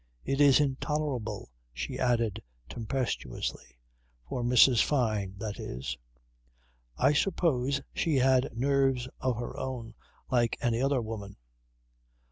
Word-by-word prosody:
"It 135 +1 0
is 140 -2 +7
intolerable," 135 - -2 0.2
she 60 0 -4
added 115 -4 +1 0.3
tempestuously 115 - -4 0.5
for 125 - -3
Mrs. 120 0 +6
Fyne 110 -9 0
that 105 0 -5
is. 65 +1 -4 1.0
I 145 - +4
suppose 140 -6 +1
she 160 -3 0
had 130 -1 +3
nerves 135 -1 +2
of 130 -2 0
her 120 - -5
own 120 -4 -5 0.4
like 120 -2 +2
any 120 0 0
other 135 -2 +1
woman. 110 -3 -6
125 Hz, 110 wpm, -29 LUFS, 110-135 Hz, 1.0 s, is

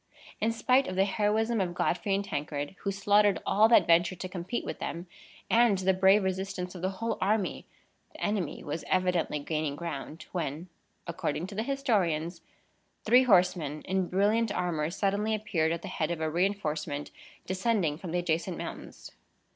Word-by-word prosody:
In 225 - +1
spite 255 +3 +2
of 185 - -4
the 190 +1 +3
heroism 215 +2 +1
of 175 -2 -2
Godfrey 195 +3 0
and 200 +1 -2
Tancred, 145 -2 -4
who 200 - -2
slaughtered 205 +1 +3
all 215 +2 +4
that 235 - +6
ventured 175 +2 +3
to 185 - -3
compete 185 +5 -4
with - - -5
them, 170 +1 -4 0.4
and 230 -3 +4
the 190 0 +2
brave 190 +2 +5
resistance 190 -1 -3
of 180 - -8
the 185 - 0
whole 230 +2 -2
army, 205 -1 0 0.4
the - - -14
enemy 205 -6 -2
was 150 +2 -4
evidently 180 -4 +1
gaining 150 0 -2
ground, 160 0 -6
when 170 0 -4 0.4
(according 170 -1 -3
to 195 - -9
the 210 - -2
historians) 190 - 0 0.6
three 250 +4 +5
horsemen, 180 - +2
in 190 -1 -1
brilliant 210 +4 +2
armor, 170 -5 -1
suddenly 200 +4 0
appeared 170 -7 0
at 170 0 -3
the - - -5
head 155 - -2
of 170 -2 -2
a 160 -1 -1
reinforcement 155 -5 -1 0.3
descending 190 -4 0
from 180 -3 -6
the 175 - 0
adjacent 175 +1 -1
mountains. - - -8
185 Hz, 170 wpm, -29 LUFS, 165-205 Hz, 0.6 s, that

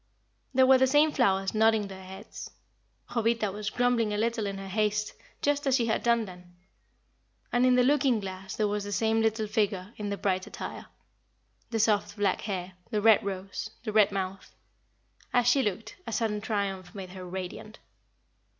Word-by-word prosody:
There 260 0 +6
were 260 0 +6
the 260 - +5
same 295 +3 +4
flowers 195 -8 +1
nodding 220 -1 +3
their 190 -1 -10
heads; 190 +3 -9 0.6
Jovita 230 -3 +1
was 210 +2 -4
grumbling 245 -2 +1
a 210 - -1
little 225 -1 0
in 195 0 -4
her 195 0 -7
haste, 210 +1 0 0.3
just 290 0 +1
as 265 - +4
she 240 -3 +2
had 225 - 0
done 235 -1 +2
then; 180 -2 -13 1.0
and 245 +1 +4
in 250 - +5
the 250 - +5
looking 270 -3 +3
glass 190 -1 -6
there 215 - +1
was 205 0 -2
the 205 - -6
same 225 +2 +2
little 220 0 +1
figure 205 -2 -1
in 210 -1 -4
the 200 - -2
bright 185 -2 -1
attire - - -7 0.8
the 225 - -1
soft 210 -1 +1
black 205 -2 +1
hair, 190 -3 -4 0.2
the 215 -3 0
red 220 0 +5
rose, 195 +2 -5
the 215 -3 -4
red 210 -2 +5
mouth. 195 0 -5 0.8
As 245 -1 +3
she 270 +3 +5
looked, 225 - -3
a - - -3
sudden 215 -1 -1
triumph 195 -4 -3
made 190 -2 -7
her 185 -1 -8
radiant. 190 +3 -6
210 Hz, 180 wpm, -28 LUFS, 195-230 Hz, 1.0 s, There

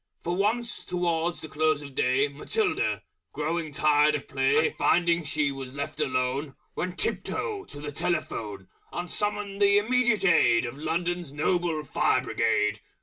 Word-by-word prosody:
For 175 +1 -1
once, 225 +5 0
towards 175 -1 -1
the - - -7
Close 155 0 +1
of 140 -1 -10
Day, 130 +3 +2
Matilda, 150 - -1 0.3
growing 160 +1 -2
tired 150 +1 +4
of 145 - -5
play, 140 +3 +2
And - - -16
finding 170 -1 +2
she 150 -1 0
was 135 -1 -7
left 140 0 -5
alone, 130 +2 -1 0.2
Went 180 0 -3
tiptoe 415 -5 -2
to - - -10
the 145 0 -5
Telephone 105 - -3 0.2
And 175 0 -4
summoned 205 -1 -2
the 200 0 +6
Immediate 240 -1 +2
Aid 125 -10 +4
Of 120 +1 -5
London's 170 +1 -2
Noble 160 +1 0
Fire - - +2
Brigade. 105 0 +1
155 Hz, 150 wpm, -27 LUFS, 140-180 Hz, 0.3 s, the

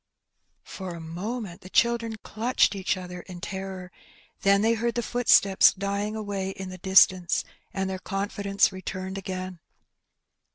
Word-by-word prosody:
^^ - - -25
For 185 -3 -6
a - - -8
moment, 180 +4 -5
the 185 - -11
children 235 +1 +2
clutched 225 0 +1
each 190 -1 -1
other 180 -1 -7
in 180 0 -10
terror; 190 -1 -6 0.5
then 200 +1 +4
they 225 +1 +4
heard 235 +1 -1
the 240 - 0
footsteps 215 -5 +5
dying 200 +2 -2
away 200 -3 -3
in 190 -1 -6
the 185 0 -9
distance, 185 -1 +4 0.3
and 195 -1 -2
their 190 0 -4
confidence 200 +1 0
returned 190 0 -5
again. 185 -2 -5
195 Hz, 150 wpm, -26 LUFS, 185-210 Hz, 0.5 s, footsteps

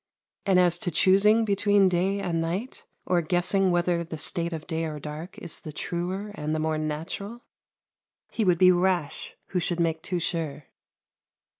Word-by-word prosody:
And 190 -2 +5
as 175 -1 +3
to 175 - -2
choosing 200 +6 +4
between 205 -1 +3
day 185 +3 +1
and 170 -4 -1
night, 185 +10 -4 0.2
or 180 -1 +2
guessing 180 +3 +2
whether 175 -1 +1
the 165 -1 -7
state 170 +2 -1
of 160 -2 -5
day 165 -1 -2
or 155 -1 -4
dark 155 +5 -8
is 170 - -6
the 155 - -8
truer 180 +6 -4
and 155 -3 -3
the - - -1
more 155 0 0
natural, 170 +9 -5 0.9
he 225 - -1
would 180 -3 +3
be 185 +1 +7
rash 175 -4 0
who 180 - 0
should 175 0 -1
make 165 -1 0
too 180 +1 -2
sure. 155 -4 -3
175 Hz, 170 wpm, -26 LUFS, 160-190 Hz, 0.9 s, be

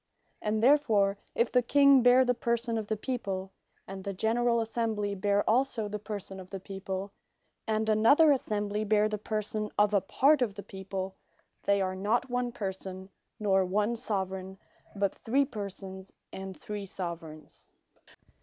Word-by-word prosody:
And 215 +1 -1
therefore 215 -8 +4 0.2
if 235 - +1
the 250 - +4
King 280 +1 +5
bear 250 +2 +6
the 250 - +3
person 235 0 -1
of 215 - -6
the 220 - -1
People, 200 -6 -3 0.4
and 190 0 -7
the 200 0 -4
generall 235 +3 +2
Assembly 220 -2 -1
bear 200 +1 +1
also 235 -2 +1
the 210 0 -4
person 200 -2 -6
of 185 -1 -11
the 195 - -6
People, 195 +1 -5 0.6
and 220 0 0
another 230 +9 +5
assembly 210 -5 -1
bear 215 0 +3
the 210 -1 -3
person 215 0 -2
of 210 0 +3
a 200 - +4
Part 285 +7 +3
of 215 -5 0
the 200 - -7
people, 190 0 -5 0.5
they 200 -1 +2
are 185 0 -1
not 225 +6 0
one 245 0 0
Person, 190 -2 -6 0.3
nor 195 -2 +3
one 210 +5 0
Soveraign, 190 -4 -3 0.4
but 200 -1 0
three 275 +5 +3
Persons, 195 -5 -7 0.2
and 190 -1 -7
three 205 -1 -6
Soveraigns. 165 -4 -7
210 Hz, 155 wpm, -29 LUFS, 195-230 Hz, 0.6 s, bear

